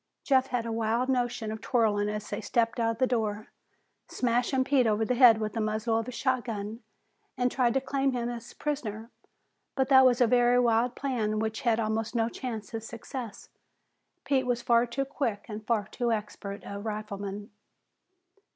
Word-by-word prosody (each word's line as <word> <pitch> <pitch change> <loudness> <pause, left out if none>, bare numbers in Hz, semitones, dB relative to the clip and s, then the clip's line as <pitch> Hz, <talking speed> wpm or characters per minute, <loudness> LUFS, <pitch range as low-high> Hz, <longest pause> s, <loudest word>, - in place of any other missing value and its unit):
Jeff 265 -2 +3
had 245 -3 -2
a 230 - -3
wild 230 +3 0
notion 245 -4 -1
of 220 0 -7
whirling 210 -4 +2
as 210 0 -4
they 205 - -3
stepped 235 0 0
out 230 -1 +1
the 255 - +3
door, 220 -4 -2 0.6
smashing 250 +2 +1
Pete 260 -3 +3
over 215 0 +1
the 250 - +1
head 240 -3 +7
with 215 -1 -3
the 225 - -1
muzzle 215 +1 0
of 225 - -5
his 250 - -6
shotgun, 230 -4 -2 0.6
and 250 0 +1
trying 245 -3 +2
to 270 - +2
claim 270 0 0
him 240 -2 -2
as 240 -1 -7
prisoner. 230 -6 -4 0.6
But 265 0 +1
that 265 -1 +8
was 250 -2 +4
a 245 - +6
very 245 +1 +4
wild 240 0 +2
plan 230 -6 -1
which 220 0 -2
had 230 -2 +2
almost 220 +1 -1
no 225 0 +2
chance 225 -5 -6
of 225 - -3
success. 230 -1 -8 0.8
Pete 265 -3 +1
was 240 -1 0
far 235 0 +3
too 265 +4 -2
quick 265 -7 -3
and 215 0 -7
far 220 -4 +1
too 240 +3 -2
expert 210 -2 -4
a 200 0 -6
rifleman. 205 -1 -5
230 Hz, 180 wpm, -28 LUFS, 215-250 Hz, 0.8 s, that